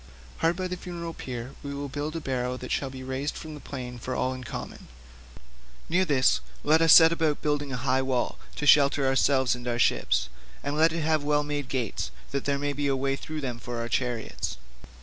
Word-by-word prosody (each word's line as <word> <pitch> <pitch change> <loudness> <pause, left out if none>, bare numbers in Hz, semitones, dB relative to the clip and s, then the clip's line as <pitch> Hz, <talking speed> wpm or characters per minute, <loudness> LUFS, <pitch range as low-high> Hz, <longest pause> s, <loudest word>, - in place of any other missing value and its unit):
Hard 165 +1 +2
by 185 +1 -2
the 180 0 -4
funeral 170 -2 -6
pyre 125 -2 -6
we 140 0 -5
will 140 0 -4
build 145 +3 -4
a - - -1
barrow 125 -3 -2
that 125 0 -7
shall 135 - 0
be 130 0 -8
raised 130 +3 -3
from 155 -1 -7
the 150 - -8
plain 125 -4 -7
for 130 +2 -4
all 130 +1 0
in 130 0 -7
common; - - -7 1.0
near 185 +3 +3
this 140 -5 +3 0.2
let 155 +2 +4
us 165 -1 +6
set 165 0 +10
about 160 -3 0
building 145 -2 0
a 125 - -2
high 130 +1 +1
wall, 130 -2 -1 0.2
to 150 - -3
shelter 140 -1 +5
ourselves 135 -1 +3
and 125 0 -6
our 120 -1 0
ships, 65 - +2 0.4
and 145 +1 -2
let 160 +1 +4
it 165 0 -2
have 155 -1 +1
well 150 0 +2
made 145 -2 -3
gates 120 - -2 0.2
that 140 -1 -2
there 140 -1 +1
may 145 0 -1
be 145 +1 -1
a 135 - +2
way 135 +1 0
through 155 +2 -6
them 125 -4 -4
for 120 0 -5
our 115 0 -2
chariots. 115 - -2
140 Hz, 220 wpm, -27 LUFS, 130-150 Hz, 1.0 s, set